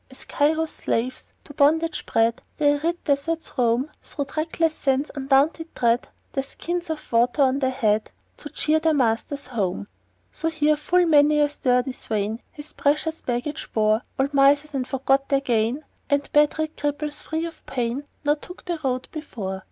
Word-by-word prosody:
As 260 - -12
Cairo's 315 +2 +1
slaves, 250 +3 -3
to 290 - -12
bondage 315 +3 +2
bred, 225 +1 +2 0.2
The 295 -1 +4
arid 325 +4 0
deserts 310 +3 -1
roam, 250 +3 +1
Through 285 - -5
trackless 315 +2 -1
sands 275 0 0
undaunted 285 +4 +1
tread, 235 0 +2 0.3
With 270 0 -2
skins 345 0 -4
of 315 -1 -5
water 240 +5 +3
on 265 +1 +2
their 260 -2 +1
head 220 -5 +1 0.3
To - - -8
cheer 310 +1 +1
their 320 -1 +2
masters 250 +2 0
home, 205 -6 -2 0.4
So 325 - -3
here 305 -1 +2
full 350 +4 +2
many 300 -2 +5
a 295 0 +4
sturdy 250 -2 +1
swain 220 -2 -3
His 295 0 -9
precious 305 +3 0
baggage 250 +4 -3
bore; 215 0 +3 0.2
Old 275 +2 0
misers 285 +2 +4
e'en 265 -2 -1
forgot 270 +1 +1
their 275 - +3
gain, 240 +3 0 0.3
And 285 0 0
bed 295 +1 +4
rid 315 0 -3
cripples, 295 0 -2
free 320 +1 -2
from - - -25
pain, 255 +2 -2 0.2
Now 290 0 +4
took 355 +4 -10
the 345 -3 -2
road 255 -1 -1
before. 210 -11 -5
285 Hz, 170 wpm, -24 LUFS, 250-310 Hz, 0.4 s, many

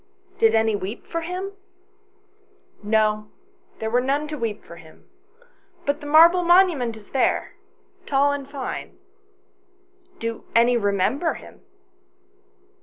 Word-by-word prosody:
"Did 225 0 +4
any 220 -1 +2
weep 200 +3 -6
for 335 - -4
him?" 365 +4 -5 0.7
" 400 - -35
No, 215 -1 0 0.5
there 220 0 -3
were 245 +1 +3
none 280 +4 -1
to 305 - -4
weep 230 -6 -4
for 170 - -12
him; 160 -2 -17 0.8
but 285 +1 0
the 290 - -8
marble 335 +4 +6
monument 340 -10 +3
is 210 - -17
there, 265 - 0 0.5
tall 280 +1 +3
and 280 -1 -5
fine." 280 -2 -6 1.2
"Do 230 0 -5
any 235 +1 +5
remember 215 - 0
him - - -13
260 Hz, 125 wpm, -23 LUFS, 220-315 Hz, 1.2 s, marble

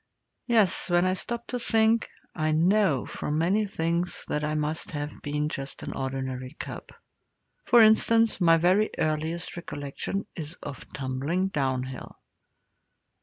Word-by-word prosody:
Yes, 220 -8 +2
when 175 +1 +3
I 185 - +2
stop 235 +5 -2
to 250 - -2
think, 225 -1 +3 0.2
I 155 -1 0
know, 170 - +3
from 150 - -3
many 195 +6 +2
things, 170 -1 -2
that 150 - -1
I 150 0 -1
must 150 +1 -2
have 145 -1 -5
been 150 +1 -1
just 140 -2 -5
an - - -5
ordinary 130 0 -4
cub. - - -7 0.8
For 240 -2 +7
instance, 225 0 +4
my 165 -1 +6
very 185 +6 +3
earliest 160 +2 -1
recollection 170 +4 -4
is 160 0 -6
of 140 - -9
tumbling 140 +8 -1
downhill. 130 -5 -3
165 Hz, 135 wpm, -27 LUFS, 145-195 Hz, 0.8 s, For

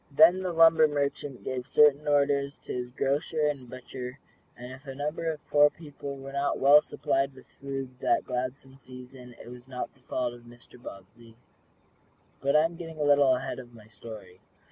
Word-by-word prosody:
Then 160 +6 +6
the 185 -1 -2
lumber 165 -1 +6
merchant 145 -2 -3
gave 130 0 -4
certain 150 0 +4
orders 140 -1 +1
to - - -6
his 125 -1 -4
grocer 145 +4 -1
and 140 -4 -2
butcher, 130 0 -8 0.4
and 125 +1 -9
if 135 +2 -12
a 135 - -6
number 150 +4 -3
of 150 -2 -10
poor 145 0 +5
people 145 -2 -9
were 135 0 -9
not 140 +1 0
well 145 +2 +7
supplied 135 -2 -1
with 130 - -15 0.2
food 135 -2 -6
that - - +1
gladsome 130 +1 -5
season, 125 -1 -12
it - - -11
was 125 +1 -12
not 125 -1 -6
the 135 - -28
fault 125 -1 -3
of 120 - -13
Mr. 120 +1 -16
Bobbsey. 115 +2 -13 1.0
But 140 +1 +1
I 150 - +6
am 165 +1 -2
getting 165 -2 -8
a - - 0
little 145 -2 +5
ahead 130 +1 -5
of 120 -2 -12
my 110 -2 -15
story. 105 -5 -11
135 Hz, 190 wpm, -28 LUFS, 125-145 Hz, 1.0 s, well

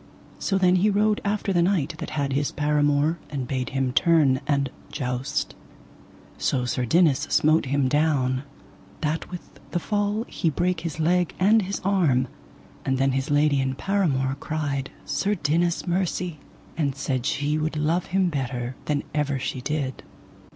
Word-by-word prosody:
So 195 - 0
then 185 -1 +4
he 200 +4 +3
rode 210 +1 +2
after 200 -1 0
the 175 - +3
knight 170 -4 +1
that - - -5
had 140 -2 0
his 140 +1 0
paramour, 145 +2 +2
and 135 -4 -4
bade 130 -2 -2
him 135 -2 -1
turn 150 -5 +4
and 140 -2 +1 0.2
joust. 130 0 -2 0.9
So 125 -2 0
Sir 125 0 -1
Dinas 160 0 +3
smote 155 +1 +3
him 140 0 +1
down, 135 -3 +1 0.6
that 155 +1 -2
with 180 -1 -10
the 175 - -1
fall 205 +3 -1
he 165 - 0
brake 175 +3 0
his 160 -2 -5
leg 175 +2 +2
and 215 +4 +5
his 200 +1 -3
arm. 155 -11 +2 0.5
And 130 0 0
then 135 +1 +2
his 135 +3 -1
lady 145 -1 +3
and 130 0 -2
paramour 140 -10 0
cried 145 -4 -2 0.2
Sir 205 +1 0
Dinas 170 +1 0
mercy, 175 -2 -1 0.4
and 140 -4 0
said 135 -2 -2
she 150 0 0
would 155 0 -2
love 160 +4 0
him 190 -1 +2
better 125 -4 -3
than 145 -1 0
ever 145 -2 0
she 130 0 -3
did. 140 -1 -2
150 Hz, 160 wpm, -25 LUFS, 135-175 Hz, 0.9 s, and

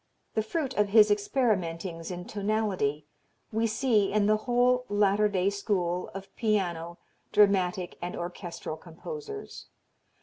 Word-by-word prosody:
The 220 - +1
fruit 275 +4 -2
of 210 -1 +3
his 210 0 +6
experimentings 190 -7 0
in 180 -1 -5
tonality 200 -9 -1 0.5
we 225 +1 +1
see 220 -2 +2
in 210 0 +2
the 215 +1 +4
whole 250 +1 +3
latter 205 0 +3
day 195 0 +1
school 185 -4 -1
of 195 0 -9
piano, 175 -6 -1 0.3
dramatic 190 -3 +2
and 175 +1 -4
orchestral 175 -2 -6
composers. 425 - -8
200 Hz, 125 wpm, -28 LUFS, 180-220 Hz, 0.5 s, his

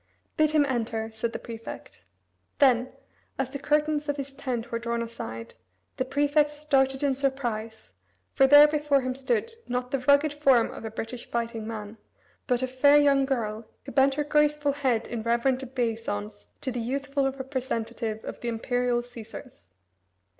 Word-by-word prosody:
"Bid 310 0 +3
him 305 -1 +3
enter," 225 -4 -2
said 225 +1 -2
the - - -4
prefect. 230 -1 -9 0.6
Then, 255 -2 +4 0.5
as 270 -1 -2
the 280 - -5
curtains 300 +1 +1
of 290 - 0
his 275 -1 -6
tent 245 -3 -4
were 230 - -1
drawn 235 0 -2
aside, 115 - -7 0.4
the 260 - 0
prefect 290 +2 +2
started 275 -2 +1
in 280 -1 +3
surprise, 240 -5 -3 0.4
for 270 - +5
there 290 +2 +9
before 295 -2 +2
him 255 0 -2
stood, 430 - -1 0.2
not 250 +1 -2
the 275 - 0
rugged 285 +3 +3
form 270 -5 +3
of - - -9
a - - -3
British 225 +2 -6
fighting 230 -2 -3
man, 215 -1 -6 0.5
but 250 -1 +1
a - - +1
fair 285 +3 +5
young 280 -2 +4
girl, 220 -4 -2 0.2
who - - -7
bent 270 0 +3
her 295 - 0
graceful 295 0 +2
head 260 -5 0
in 235 -2 -4
reverent 240 +3 +1
obeisance 225 -5 -3
to 260 - -2
the 245 -1 -3
youthful 275 +2 -1
representative 240 -4 -4
of - - -6
the 240 - -4
Imperial 240 +1 0
Caesars. 240 - -11
260 Hz, 165 wpm, -27 LUFS, 230-280 Hz, 0.6 s, there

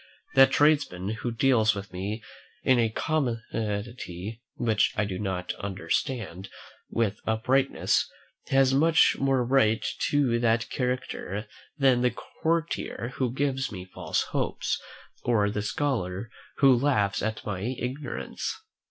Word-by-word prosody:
That 135 0 +7
tradesman 145 -12 +2
who 120 - -1
deals 115 -2 +3
with 100 -2 -7
me 100 +5 -4 0.4
in 130 -2 +4
a 115 -1 +3
commodity 115 - -3
which 110 -3 +2
I 105 - +2
do 95 -2 -4
not 95 -3 -2
understand, 100 - -3 0.4
with 110 -3 0
uprightness, 130 +5 +2 0.4
has 135 -1 +4
much 160 +4 +5
more 135 -2 +2
right 115 -4 +3 0.2
to 135 -5 +2
that 115 0 +1
character 125 -5 -3 0.3
than 130 -3 +4
the 125 - +4 0.3
courtier 160 -6 -1
who 130 -3 0
gives 135 0 -1
me 90 -3 -7
false - - -1
hopes, - - -1 0.4
or 105 -4 +2
the 105 - -2
scholar 110 -4 -2 0.3
who 135 -3 +6
laughs 120 -7 +1
at 110 0 -3
my 100 -3 -3
ignorance. 125 +6 -4
115 Hz, 125 wpm, -27 LUFS, 105-135 Hz, 0.4 s, That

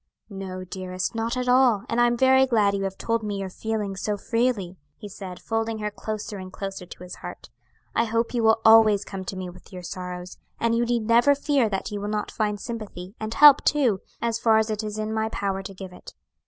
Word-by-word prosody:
"No, 190 -1 -6
dearest; 185 0 -4
not 230 +2 -2
at 250 0 -2
all; 250 -5 +4
and 235 +1 +1
I 240 - +6
am 240 0 0
very 265 +1 +5
glad 215 -5 +3
you 195 -1 -1
have 195 0 -4
told 230 0 -1
me 205 -2 -3
your 195 -1 -4
feelings 210 -2 -3
so 210 -1 -1
freely," 230 -5 -1 0.2
he 210 - -9
said, 190 -2 -8
folding 225 0 -2
her 210 -1 -3
closer 210 +1 -5
and 185 0 -8
closer 195 -2 -6
to 180 - -11
his 180 0 -9
heart. - - -9 0.4
"I 230 - +2
hope 230 +2 -1
you 240 - +1
will 225 0 +4
always 220 -2 +6
come 190 -1 -6
to 190 - -5
me 185 -1 -4
with 180 0 -13
your 180 -1 -8
sorrows, 180 0 -7 0.2
and 230 0 +1
you 235 +1 +2
need 235 -2 0
never 240 +5 +5
fear 280 -5 +1
that 195 +1 -3
you 205 -1 -4
will 205 - -3
not 210 0 -2
find 210 -2 -1
sympathy, 210 -6 -7
and 220 +1 -4
help 295 -1 +8
too, 250 -10 +2 0.2
as 230 -1 0
far 225 -1 +4
as 220 0 +1
it 215 0 -2
is 210 0 -4
in 215 0 -2
my 220 0 0
power 195 -3 -2
to 195 +1 -8
give 185 -1 -9
it. - - -13
215 Hz, 235 wpm, -25 LUFS, 195-230 Hz, 0.4 s, help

